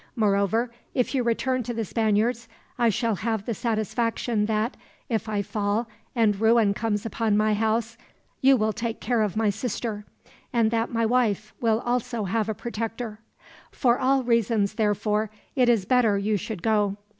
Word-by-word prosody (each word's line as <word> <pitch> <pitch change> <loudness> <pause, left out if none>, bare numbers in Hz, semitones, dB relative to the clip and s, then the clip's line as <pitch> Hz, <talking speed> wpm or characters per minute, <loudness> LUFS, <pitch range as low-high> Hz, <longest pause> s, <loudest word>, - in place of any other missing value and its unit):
Moreover, 215 +2 +1 0.2
if 250 +1 +1
you 265 - +2
return 250 +2 0
to 240 0 -4
the 225 -1 -2
Spaniards, 225 +3 0 0.3
I 235 -1 +4
shall 225 +1 0
have 220 -1 -2
the 235 - -1
satisfaction 225 0 -1
that, 220 +3 0 0.3
if 220 -2 -1
I 205 -1 0
fall 210 +3 -1 0.3
and 215 -4 +2
ruin 225 -2 +4
comes 210 0 -2
upon 225 -1 0
my 215 0 +3
house, 225 +2 0 0.4
you 270 0 +6
will 215 -1 +1
take 230 +2 -3
care 240 -3 0
of 210 -2 -1
my 220 -2 +2
sister, 220 -1 -4 0.5
and 230 -4 +2
that 230 0 0
my 230 -1 +1
wife 220 -3 +1
will 225 -1 +2
also 240 -2 -1
have 215 +3 -1
a 220 - -1
protector. 225 -1 -5 0.5
For 245 -2 +2
all 265 0 +2
reasons, 230 -4 +1
therefore, 210 0 0 0.3
it 250 -3 +4
is 225 -6 +3
better 230 -3 +3
you 210 +2 0
should 200 -1 -5
go. 205 -2 +1
225 Hz, 165 wpm, -25 LUFS, 210-235 Hz, 0.5 s, you